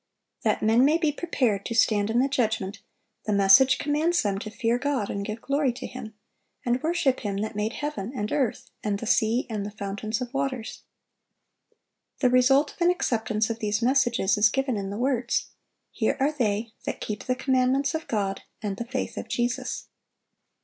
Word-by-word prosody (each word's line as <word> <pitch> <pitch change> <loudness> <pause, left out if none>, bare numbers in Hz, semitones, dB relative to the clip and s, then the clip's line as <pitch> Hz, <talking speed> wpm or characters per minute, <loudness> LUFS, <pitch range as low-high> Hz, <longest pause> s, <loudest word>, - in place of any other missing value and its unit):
That - - 0
men 225 +3 +5
may 300 +4 +4
be 315 -3 +1
prepared 255 - 0
to 230 - -4
stand 210 -2 +3
in 225 - +1
the 260 +2 +4
judgment, 220 -7 -1 0.5
the - - +1
message 200 +6 +6
commands 310 +4 +1
them 200 -2 0
to 215 - -6
"fear 235 +1 0
God, 270 -7 -1
and 200 - -3
give 215 +2 -6
glory 280 -1 +1
to 240 - -7
Him," 225 -4 -8 0.5
"and 245 +1 +1
worship 310 -5 +1
Him 205 -4 -3
that 215 0 -4
made 210 +2 -1
heaven, 290 -8 -4
and 210 -3 -3
earth, 260 -7 -1
and 205 -2 0
the 230 - -6
sea, 230 +1 +2
and 215 -4 -3
the 205 - -4
fountains 205 +1 -4
of 250 +1 -5
waters." 270 -4 -3 1.4
The 250 -3 +2
result 270 +3 +4
of - - -22
an 345 - +5
acceptance 220 -9 0
of 230 - -5
these 210 0 -1
messages 240 -6 +2
is 210 +1 +6
given 270 0 0
in 195 -2 -3
the 200 - -5
words, 245 -1 0 0.4
"Here - - 0
are 275 +3 +2
they 225 -5 -1
that - - -3
keep 210 0 -5
the 255 -1 0
commandments 265 +1 +1
of 320 0 -4
God, 200 -3 -1 0.2
and 205 -2 -4
the 235 - -4
faith 255 +2 -4
of - - -5
Jesus." 240 +1 -2
235 Hz, 190 wpm, -26 LUFS, 210-270 Hz, 1.4 s, message